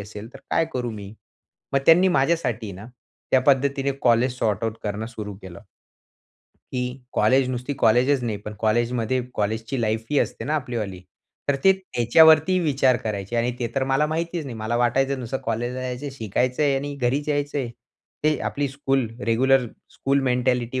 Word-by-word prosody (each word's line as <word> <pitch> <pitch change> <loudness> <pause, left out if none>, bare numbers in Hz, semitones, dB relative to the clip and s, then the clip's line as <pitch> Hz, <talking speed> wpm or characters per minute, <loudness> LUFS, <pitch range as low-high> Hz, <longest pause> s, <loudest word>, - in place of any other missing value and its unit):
असेल 105 +3 -9
तर - - -9
काय - - +3
करू 125 -2 -2
मी? 100 -1 -8 0.6
मग 135 - +4
त्यांनी 180 +3 +7
माझ्यासाठी 135 - 0
ना. 100 +5 -10 0.4
त्या 130 - +5
पद्धतीने 140 0 +2
कॉलेज 125 +1 +3
सॉर्ट 110 -2 0
आउट 110 0 -2
करणं 105 +2 -3
सुरू 105 -4 -7
केलं. 90 -2 -10 1.1
की 125 +1 -3
कॉलेज 130 0 +3
नुसती 125 +3 -3
कॉलेजच 125 +4 +3
नाही 110 -3 -2
पण 105 - -6
कॉलेजमध्ये 120 +2 +1
कॉलेजची 110 +4 -2
लाईफ 110 0 -1
ही 145 - +3
असते - - -2
ना 150 +5 -1
आपली 125 -5 -2
वाली. 95 -5 -4 0.5
तर 140 - +3
ते 190 - +8
त्याच्या 160 -7 +2
वरती 160 +4 +5
विचार 135 -5 +3
करायचे 105 +1 -3
आणि 120 +1 +1
ते 120 - -1
तर 135 -1 +1
मला 135 +3 +2
माहितीच 165 +1 -3
नाही. 125 -5 -7
मला 110 +2 -2
वाटायचं 130 +3 +1
नुसतं 125 +2 -3
कॉलेजला 120 +3 -2
जायचं 130 +3 -4
शिकायचं 125 +4 -1
आहे 140 -2 +3
आणि 145 +1 -4
घरीच 140 +3 -1
यायचंय. 145 -3 -1 0.6
ते 155 -1 +3
आपली 140 -1 -2
स्कूल 135 -3 -1 0.2
रेग्युलर 125 +2 +3 0.2
स्कूल 140 +1 0
मेंटॅलिटी, 125 0 0
125 Hz, 170 wpm, -23 LUFS, 115-140 Hz, 1.1 s, ते